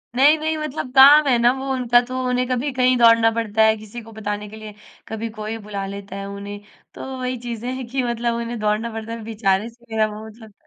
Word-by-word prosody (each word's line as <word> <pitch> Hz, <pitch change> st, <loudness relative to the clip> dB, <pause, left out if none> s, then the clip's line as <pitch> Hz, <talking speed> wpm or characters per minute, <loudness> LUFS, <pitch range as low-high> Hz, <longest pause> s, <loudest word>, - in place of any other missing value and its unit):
नहीं, 285 Hz, +5 st, +5 dB
नहीं। 315 Hz, 0 st, -1 dB
मतलब 305 Hz, -4 st, -4 dB
काम 285 Hz, +2 st, +8 dB
है 250 Hz, -, +4 dB
ना 240 Hz, +1 st, +5 dB
वो 270 Hz, 0 st, -6 dB
उनका 245 Hz, -2 st, +3 dB
तो 255 Hz, +1 st, -6 dB
उन्हें 250 Hz, 0 st, 0 dB
कभी 255 Hz, +3 st, -1 dB
कहीं 255 Hz, 0 st, +3 dB
दौड़ना 230 Hz, -1 st, +6 dB
पड़ता 220 Hz, -1 st, +1 dB
है, 220 Hz, 0 st, +4 dB
किसी 215 Hz, +3 st, -9 dB
को 225 Hz, 0 st, -14 dB
बताने 210 Hz, -1 st, -5 dB
के 215 Hz, -, -11 dB
लिए। 215 Hz, -1 st, -9 dB, 0.3 s
कभी 220 Hz, +1 st, -4 dB
कोई 215 Hz, 0 st, -6 dB
बुला 200 Hz, -2 st, -4 dB
लेता 200 Hz, 0 st, -8 dB
है 195 Hz, 0 st, -5 dB
उन्हें, 200 Hz, +1 st, -7 dB, 0.3 s
तो -, -, -8 dB
वही 255 Hz, 0 st, -3 dB
चीज़ें 240 Hz, +1 st, -5 dB
हैं 260 Hz, -1 st, -5 dB
कि 260 Hz, +2 st, -2 dB
मतलब 235 Hz, -1 st, -1 dB
उन्हें 235 Hz, 0 st, -4 dB
दौड़ना 215 Hz, +2 st, -1 dB
पड़ता 225 Hz, 0 st, -6 dB
है 230 Hz, -, -7 dB
बेचारे 215 Hz, -1 st, 0 dB
से 235 Hz, +1 st, -23 dB
मेरा 220 Hz, -1 st, +2 dB
वो 215 Hz, +1 st, -9 dB
मतलब 220 Hz, -1 st, -14 dB
230 Hz, 230 wpm, -21 LUFS, 215-250 Hz, 0.3 s, काम